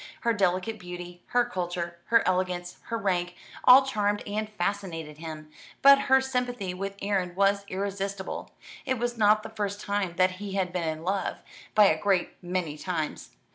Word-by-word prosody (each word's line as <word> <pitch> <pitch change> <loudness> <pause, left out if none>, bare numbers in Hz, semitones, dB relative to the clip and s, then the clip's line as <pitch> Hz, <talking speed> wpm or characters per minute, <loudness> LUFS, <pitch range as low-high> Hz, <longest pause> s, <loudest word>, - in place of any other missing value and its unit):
Her 235 -1 +2
delicate 195 +2 0
beauty, 175 -1 -8
her 245 0 +3
culture, 175 -1 -4
her 230 -4 +3
elegance, 180 -1 -1
her 230 - -2
rank, 180 -4 -1 0.3
all 260 +2 +9
charmed 205 -5 0
and 210 +1 -2
fascinated 175 -6 -3
him; 155 -1 -8 0.3
but 275 0 +9
her 265 0 +7
sympathy 250 -7 -2
with 195 +2 -5
Erin 190 -3 -1
was 200 +1 +2
irresistible. 195 0 -4 0.3
It 260 -2 -1
was 240 +1 -1
not 215 -1 +4
the - - -7
first 205 -2 -3
time 200 -4 -2
that 185 0 +4
he 200 -2 -5
had 185 -2 -1
been 175 -3 -1
in 155 0 -5
love, 195 +2 -1 0.4
by 210 -1 +8
a 195 - +3
great 195 -3 +2
many 175 -4 -3
times. 160 -3 -4
195 Hz, 170 wpm, -27 LUFS, 175-210 Hz, 0.4 s, all